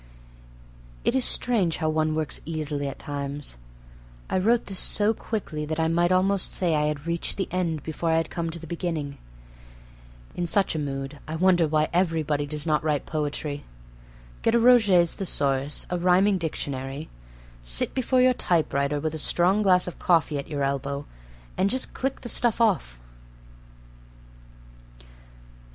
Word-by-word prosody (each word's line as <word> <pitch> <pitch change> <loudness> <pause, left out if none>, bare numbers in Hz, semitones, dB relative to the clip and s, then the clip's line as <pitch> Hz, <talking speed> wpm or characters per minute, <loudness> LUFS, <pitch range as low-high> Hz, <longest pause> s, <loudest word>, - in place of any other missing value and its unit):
It - - +3
is 265 -1 +2
strange 210 -12 +1
how 160 - -1
one 155 0 +1
works 155 -2 -2
easily 150 -3 -3
at 135 - -6
times. 140 - -5 0.8
I 185 - +2
wrote 230 +5 +2
this 195 -2 -4
so 210 +1 +3
quickly 200 -9 -4
that 155 +1 -3
I 160 0 +2
might 175 +2 +2
almost 190 +1 +2
say 175 -3 +1
I 150 0 +1
had 150 0 -3
reached 170 0 -1
the 190 - -1
end 170 -5 -1
before 160 +1 -3
I 160 - +3
had 165 - -1
come 170 -1 -3
to 165 - -5
the 165 - -10
beginning. 165 -4 -4 1.1
In 175 - -2
such 195 +3 +2
a 160 - -2
mood 135 0 -4
I 155 - -4
wonder 175 -1 +3
why 155 0 +2
everybody 160 -5 0
does 150 0 -1
not 155 -2 +1
write 150 -2 0
poetry. 150 -1 -3 0.8
Get 230 - +2
a - - +5
Roget's 210 -8 +5
Thesaurus, 140 -6 0
a 180 - 0
rhyming 185 +2 +3
dictionary: 140 -3 -4 0.5
sit - - 0
before 255 0 +2
your 255 0 +5
typewriter 150 - 0
with 155 +1 -2
a 160 - -4
strong 180 +7 +3
glass 185 -3 +4
of 180 - -7
coffee 160 -4 +2
at 140 - -7
your 145 -3 -2
elbow, 140 +1 -2 0.5
and 190 +1 +3
just 260 +4 -2
click 270 +1 -3
the - - -7
stuff 240 -1 +1
off. 190 - +1
160 Hz, 160 wpm, -25 LUFS, 145-185 Hz, 1.1 s, a